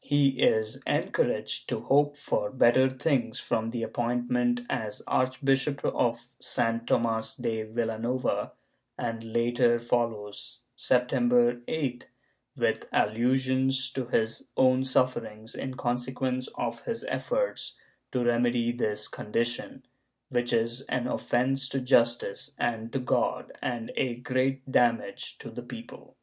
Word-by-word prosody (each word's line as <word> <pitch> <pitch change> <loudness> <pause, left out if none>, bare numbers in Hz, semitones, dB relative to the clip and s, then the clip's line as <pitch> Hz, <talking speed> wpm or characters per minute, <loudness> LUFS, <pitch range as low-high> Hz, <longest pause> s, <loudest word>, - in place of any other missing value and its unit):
He 145 -1 +4
is 110 0 +3
encouraged - - 0
to - - -2
hope 145 +1 +3
for 105 -7 -1
better 130 0 +5
things 130 -3 0
from 110 0 -1
the 115 0 -3
appointment 120 +1 0
as 105 -2 -3
archbishop 135 +2 +1
of 120 +1 0
San 115 0 -1
Tomas 115 -1 +1
de 110 -1 -2
Vilanova, 115 +2 -1 0.5
and 115 -1 -3
the 115 - -9
latter 120 +1 +3
follows, 115 -3 -2
September 125 -1 +3
8th, 135 -6 -2 0.5
with - - 0
allusions 130 +3 +2
to 130 -2 -3
his 110 -2 0
own 130 0 +5
sufferings 115 -4 -1
in 130 -1 -5
consequence 125 +1 -1
of 115 -1 -3
his 230 0 -3
efforts - - -1 0.4
to 125 -2 0
remedy 120 0 +2
this 105 -3 -2
condition, 120 +4 -2 0.5
which 120 -2 0
is 115 +2 +1
an 125 -1 0
offence 130 +2 0
to 135 - -1
justice 125 +1 +2
and 115 -1 -1
to 135 - -1
God 125 -2 0
and 120 -2 -3
a 125 -3 0
great 130 +2 -1
damage 120 -3 +1
to - - -9
the - - -6
people. - - -11
120 Hz, 125 wpm, -28 LUFS, 115-130 Hz, 0.5 s, better